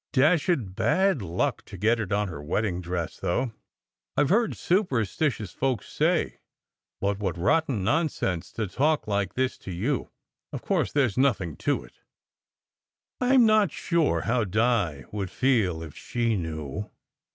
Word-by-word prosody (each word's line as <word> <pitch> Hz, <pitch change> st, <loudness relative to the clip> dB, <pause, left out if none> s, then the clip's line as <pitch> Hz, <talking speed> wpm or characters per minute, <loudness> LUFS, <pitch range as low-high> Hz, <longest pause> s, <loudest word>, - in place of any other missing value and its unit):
"Dashed 145 Hz, -, +2 dB
bad 185 Hz, -, +2 dB
luck 85 Hz, -2 st, -1 dB
to 100 Hz, -, -10 dB
get 110 Hz, +5 st, +2 dB
it 105 Hz, -2 st, -3 dB
on 105 Hz, +1 st, +1 dB
her 80 Hz, -6 st, -7 dB
wedding 90 Hz, +4 st, -1 dB
dress, 85 Hz, -1 st, -3 dB
though, 115 Hz, +8 st, 0 dB, 0.7 s
I 145 Hz, -, +5 dB
ve 145 Hz, -, 0 dB
heard 225 Hz, +4 st, +2 dB
superstitious 130 Hz, -, 0 dB
folks 130 Hz, -6 st, -1 dB
say -, -, 0 dB, 0.6 s
but 100 Hz, 0 st, 0 dB
what 95 Hz, -4 st, -2 dB
rotten 135 Hz, -, +1 dB
non 155 Hz, -, +2 dB
sense 90 Hz, -, -3 dB
to 110 Hz, -, -2 dB
talk 150 Hz, -, +1 dB
like 100 Hz, -2 st, -1 dB
this 130 Hz, 0 st, 0 dB
to 95 Hz, -, -8 dB
you! 115 Hz, +10 st, -1 dB, 0.4 s
Of -, -, -6 dB
course, -, -, 0 dB
there 145 Hz, -2 st, +3 dB
s 105 Hz, -6 st, -4 dB
nothing 125 Hz, -10 st, +2 dB
in -, -, 0 dB
it." -, -, -21 dB, 1.2 s
"I 255 Hz, +2 st, +3 dB
m 250 Hz, -3 st, +7 dB
not 215 Hz, -3 st, +4 dB
sure 170 Hz, -3 st, +1 dB
how 120 Hz, 0 st, +1 dB
Di 105 Hz, -, +1 dB
would 100 Hz, -3 st, -3 dB
feel 105 Hz, -12 st, +1 dB
if 80 Hz, -3 st, -10 dB
she 115 Hz, -2 st, -1 dB
knew. 80 Hz, +2 st, -4 dB
110 Hz, 160 wpm, -26 LUFS, 95-145 Hz, 1.2 s, m